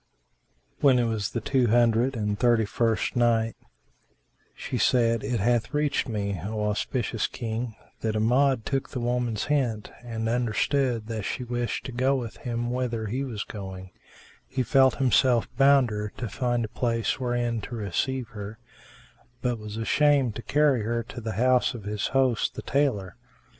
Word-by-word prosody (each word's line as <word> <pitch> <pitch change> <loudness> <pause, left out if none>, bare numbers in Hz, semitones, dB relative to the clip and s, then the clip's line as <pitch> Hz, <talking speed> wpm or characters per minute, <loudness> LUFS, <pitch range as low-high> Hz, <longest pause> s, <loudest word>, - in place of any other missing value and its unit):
When 135 -3 +5
it 120 - +3
was 110 -4 -1
the 120 - -3
Two 130 +1 +2
Hundred 120 +3 +3
and 105 -2 -2
Thirty 120 -2 +3
first 115 +1 0
Night, 115 -2 +2 1.0
She - - -4
said, 115 -2 +3
It 120 -3 -1
hath 120 +5 +1
reached 150 -3 0
me, 100 -5 -2
O 105 +1 -3
auspicious 110 +2 -1
King, 115 -1 -4 0.2
that 110 -1 -1
Amjad 125 +2 +2
took 135 -1 -1
the 130 - -4
woman's 120 -2 -1
hint 125 -8 -1
and 115 -2 -3
understood 120 +1 0
that 110 -1 -4
she 125 +5 -3
wished 120 0 -3
to - - -5
go 130 +3 +2
with 120 -4 -4
him 120 0 -3
whither 120 -3 -2
he 125 +6 -2
was 115 -6 -4
going; 95 -3 -8 0.6
he 130 -1 -1
felt 130 0 +4
himself 125 -2 +3
bounder 125 -7 +3
to 120 - -3
find 120 +1 -1
a - - -8
place 115 +1 -1
wherein 120 -2 -1
to 120 - -6
receive 115 +4 -2
her, 105 -1 -7 0.9
but 120 -2 0
was 105 0 -7
ashamed 135 +1 +3
to - - -5
carry 145 -2 +2
her 115 +2 -1
to 120 +1 -9
the 110 -1 -3
house 125 +4 +2
of 115 - -8
his 105 0 -2
host, 130 -4 +1
the - - -6
tailor. 125 -10 0
120 Hz, 165 wpm, -26 LUFS, 110-125 Hz, 1.0 s, When